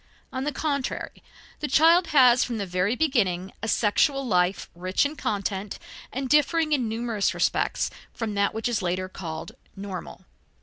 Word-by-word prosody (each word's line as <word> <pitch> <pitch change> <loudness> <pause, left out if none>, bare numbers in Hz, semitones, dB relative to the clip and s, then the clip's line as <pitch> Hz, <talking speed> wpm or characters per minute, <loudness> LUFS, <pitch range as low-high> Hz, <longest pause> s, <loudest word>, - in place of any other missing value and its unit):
On 260 +1 -2
the 295 - 0
contrary 280 -2 -3 0.4
the 300 - -2
child 330 +5 +5
has 255 -4 +6
from 235 -2 -3
the 200 - -2
very 185 +5 0
beginning 195 - 0
a 225 - -3
sexual 275 +6 +2
life 180 -3 +1
rich 185 +7 0
in 290 +2 -2
content 200 -4 -3 0.3
and 265 +1 -3
differing 305 +3 +3
in 255 -6 +1
numerous 225 -2 -1
respects - - 0 0.2
from 225 -3 -4
that 200 0 +1
which 225 - -1
is 235 -3 0
later 185 +1 -1
considered 165 -3 -7 0.2
normal. 195 -2 -7
225 Hz, 160 wpm, -25 LUFS, 190-275 Hz, 0.4 s, has